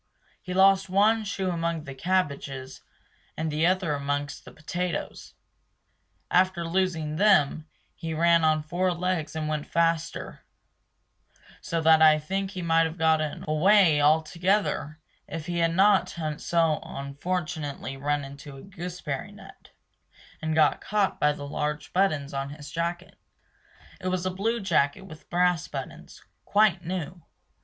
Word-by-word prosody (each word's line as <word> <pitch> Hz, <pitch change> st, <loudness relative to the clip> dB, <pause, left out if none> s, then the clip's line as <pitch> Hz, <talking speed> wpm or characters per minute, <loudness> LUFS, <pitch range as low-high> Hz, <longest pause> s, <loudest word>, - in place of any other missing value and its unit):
He 180 Hz, -, -8 dB
lost 195 Hz, 0 st, +4 dB
one 215 Hz, +4 st, +3 dB
shoe 190 Hz, -2 st, -2 dB
among 170 Hz, -2 st, -2 dB
the 140 Hz, -2 st, -8 dB
cabbages, 140 Hz, -5 st, -2 dB, 0.6 s
and 160 Hz, 0 st, -2 dB
the 155 Hz, +3 st, +2 dB
other 185 Hz, -4 st, +1 dB
amongst 145 Hz, 0 st, -3 dB
the -, -, -11 dB
potatoes. 175 Hz, +2 st, -5 dB, 1.0 s
After 180 Hz, -1 st, +2 dB
losing 165 Hz, -4 st, -1 dB
them, 160 Hz, -6 st, +3 dB, 0.3 s
he 160 Hz, 0 st, -5 dB
ran 170 Hz, +1 st, +4 dB
on 155 Hz, -1 st, +2 dB
four 180 Hz, +3 st, 0 dB
legs 175 Hz, -3 st, -2 dB
and 155 Hz, -1 st, -2 dB
went 155 Hz, -1 st, -3 dB
faster 165 Hz, -1 st, -1 dB, 1.2 s
So 165 Hz, -1 st, -2 dB
that 160 Hz, 0 st, +5 dB
I 155 Hz, -1 st, +7 dB
think 190 Hz, +6 st, -3 dB
he 185 Hz, -2 st, -6 dB
might 165 Hz, 0 st, +3 dB
have 160 Hz, +2 st, -8 dB
got 160 Hz, -1 st, +3 dB, 0.3 s
away 160 Hz, 0 st, +4 dB
altogether 160 Hz, +1 st, +1 dB, 0.3 s
if 160 Hz, -1 st, -6 dB
he 175 Hz, 0 st, -2 dB
had 165 Hz, 0 st, +1 dB
not 195 Hz, -2 st, +3 dB
unfortunately 155 Hz, -1 st, -2 dB
run 145 Hz, +1 st, -1 dB
into 140 Hz, 0 st, -10 dB
a -, -, -12 dB
gooseberry 175 Hz, -7 st, -6 dB
net -, -, -15 dB, 0.7 s
And 155 Hz, 0 st, -1 dB
got 155 Hz, -2 st, +3 dB
caught 205 Hz, -1 st, 0 dB
by 150 Hz, -, +3 dB
the 145 Hz, -1 st, -7 dB
large 150 Hz, +1 st, -3 dB
buttons 155 Hz, -8 st, +1 dB
on 135 Hz, 0 st, -3 dB
his 145 Hz, 0 st, -10 dB
jacket. 170 Hz, +2 st, -4 dB, 0.8 s
It 185 Hz, -, -5 dB
was 185 Hz, 0 st, -1 dB
a 185 Hz, -, 0 dB
blue 225 Hz, +5 st, -1 dB
jacket 165 Hz, -2 st, +1 dB
with 160 Hz, -5 st, -13 dB
brass 180 Hz, -1 st, +1 dB
buttons, -, -, -8 dB, 0.2 s
quite 205 Hz, -4 st, +3 dB
new. 175 Hz, 0 st, -5 dB
165 Hz, 140 wpm, -26 LUFS, 150-185 Hz, 1.2 s, I